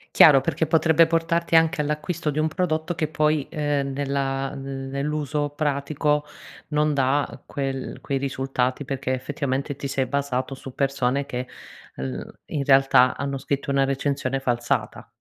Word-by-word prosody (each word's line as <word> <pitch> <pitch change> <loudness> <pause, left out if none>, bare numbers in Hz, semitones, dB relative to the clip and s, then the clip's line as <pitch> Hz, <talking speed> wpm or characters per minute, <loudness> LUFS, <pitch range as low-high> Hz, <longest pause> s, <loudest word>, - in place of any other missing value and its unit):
Chiaro, 140 -4 +8
perché 160 - 0
potrebbe 160 +1 +4
portarti 165 +1 +1
anche 160 -1 +4
all'acquisto 150 +2 -2
di 150 - -2
un 155 - +2
prodotto 165 -1 -1
che 155 - 0
poi, 150 -1 +1
ehm, 145 -2 -1
nella 135 0 -2
nell'uso 140 +2 -3
pratico 150 0 0 0.4
non 150 -1 +1
dà 135 +1 +1
quel 135 -2 -4
quei 140 - -1
risultati, 135 0 -1
perché 130 -1 -2
effettivamente 135 +1 -2
ti 140 0 -5
sei 135 -1 -1
basato 135 -1 -2
su 130 -1 -10
persone 140 0 0
che, 125 -1 -3 0.5
mhmm, 65 -1 -4 0.2
in 145 - -2
realtà 135 -2 +5
hanno 140 0 -3
scritto 140 +1 -3
una 140 0 +3
recensione 135 -1 -1
falsata. 120 -2 -1
140 Hz, 140 wpm, -24 LUFS, 135-150 Hz, 0.5 s, Chiaro